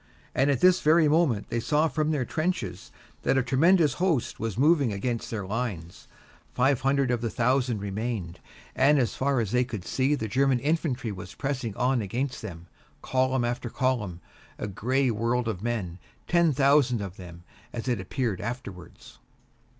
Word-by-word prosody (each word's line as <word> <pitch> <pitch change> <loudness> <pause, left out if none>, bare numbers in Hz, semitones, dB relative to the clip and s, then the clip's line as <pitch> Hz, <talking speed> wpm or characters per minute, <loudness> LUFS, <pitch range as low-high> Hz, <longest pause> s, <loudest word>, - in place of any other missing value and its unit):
And 135 +2 +2
at 135 -4 +1
this 185 0 +5
very 155 +1 +5
moment 145 -9 +2
they 115 - -1
saw 150 +7 +2
from 155 -1 -1
their 145 -5 0
trenches 125 - -3 0.3
that - - +1
a 130 - +3
tremendous 150 +4 +4
host 165 -10 0
was 115 -2 -3
moving 145 -3 +3
against 115 +4 -3
their 105 -4 -4
lines. 100 -6 -5 0.5
Five 135 +1 +2
hundred 135 -1 +2
of 120 -2 0
the 115 - -1
thousand 125 0 +1
remained, 100 -3 -4 0.4
and 145 +2 +4
as 125 -4 +1
far 135 -1 0
as 110 -4 -1
they 125 0 +3
could 110 -7 -6
see 135 +3 +1
the 110 -6 -3
German 135 +3 +2
infantry 135 -4 -1
was 95 -1 -9
pressing 130 -6 -3
on 125 -1 +1
against 125 +7 -3
them, 85 -6 -8 0.4
column 130 -1 +1
upon 120 0 -3
column, 110 -10 -1 0.4
a - - -4
gray 125 +5 0
world 115 +2 0
of 100 -5 -3
men, 105 -7 -3 0.3
ten 170 -2 +3
thousand 135 -3 +3
of 100 -2 -6
them, 85 -2 -11 0.3
as 120 +1 -6
it 120 -6 0
appeared 110 0 -2
afterwards. 110 -7 -8
125 Hz, 170 wpm, -27 LUFS, 110-140 Hz, 0.5 s, this